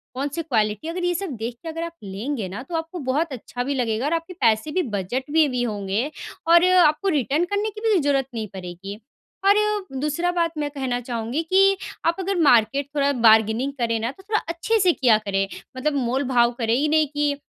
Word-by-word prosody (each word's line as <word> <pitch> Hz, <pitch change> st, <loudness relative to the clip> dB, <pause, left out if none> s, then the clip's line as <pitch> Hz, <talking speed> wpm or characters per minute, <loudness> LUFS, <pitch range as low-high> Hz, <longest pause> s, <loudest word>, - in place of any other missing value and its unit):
कौन-सी 285 Hz, +5 st, -2 dB
क्वालिटी 215 Hz, -1 st, 0 dB
है, 330 Hz, -, -3 dB
अगर 360 Hz, -, -4 dB
ये 355 Hz, -, +1 dB
सब 375 Hz, -2 st, -3 dB
देख 230 Hz, +2 st, -4 dB
के 330 Hz, -, -5 dB
अगर 330 Hz, +1 st, -4 dB
आप 335 Hz, 0 st, -5 dB
लेंगे 205 Hz, +3 st, -4 dB
ना, 200 Hz, +6 st, -6 dB
तो 330 Hz, +5 st, -6 dB
आपको 325 Hz, +2 st, -4 dB
बहुत 310 Hz, +2 st, 0 dB
अच्छा 245 Hz, 0 st, -5 dB
भी 280 Hz, +2 st, -2 dB
लगेगा 235 Hz, 0 st, -1 dB
और 305 Hz, -, 0 dB
आपकी 335 Hz, +2 st, -3 dB
पैसे 225 Hz, +5 st, +2 dB
भी 370 Hz, -, +1 dB, 0.2 s
बजट 240 Hz, +8 st, -2 dB
में 310 Hz, -1 st, +3 dB
भी 250 Hz, -1 st, -1 dB
होंगे 210 Hz, +4 st, -2 dB, 0.4 s
और 340 Hz, +1 st, +6 dB
आपको 350 Hz, +1 st, +4 dB
रिटर्न 290 Hz, +6 st, +1 dB
करने 415 Hz, +2 st, 0 dB
की 425 Hz, -, -10 dB
भी 405 Hz, -5 st, +4 dB
ज़रूरत 275 Hz, -2 st, +1 dB
नहीं 220 Hz, -2 st, -4 dB
पड़ेगी। 190 Hz, +2 st, -8 dB, 0.5 s
और 405 Hz, -, +6 dB, 0.4 s
दूसरा 300 Hz, +5 st, 0 dB
बात 335 Hz, -2 st, 0 dB
मैं 295 Hz, -1 st, -1 dB
कहना 260 Hz, -4 st, -2 dB
चाहूँगी 235 Hz, +4 st, -3 dB
कि, 390 Hz, +3 st, +4 dB, 0.3 s
आप 335 Hz, -, +3 dB
अगर 385 Hz, +1 st, -1 dB
मार्केट 275 Hz, 0 st, +4 dB
थोड़ा 285 Hz, 0 st, +2 dB
बार्गेनिंग 220 Hz, +5 st, +4 dB
करें 230 Hz, -1 st, 0 dB
ना, 230 Hz, +3 st, -2 dB
तो 385 Hz, -, -18 dB
थोड़ा 425 Hz, +1 st, 0 dB
अच्छे 375 Hz, +7 st, 0 dB
से 370 Hz, -3 st, +5 dB
किया 240 Hz, -5 st, +4 dB
करें, 195 Hz, -2 st, -1 dB, 0.3 s
मतलब 295 Hz, +3 st, 0 dB
मोल 265 Hz, 0 st, 0 dB
भाव 240 Hz, -2 st, +4 dB
करे 225 Hz, 0 st, +1 dB
ही 295 Hz, +3 st, +1 dB
नहीं 310 Hz, -1 st, +3 dB
कि, 290 Hz, 0 st, 0 dB
280 Hz, 215 wpm, -23 LUFS, 230-330 Hz, 0.5 s, और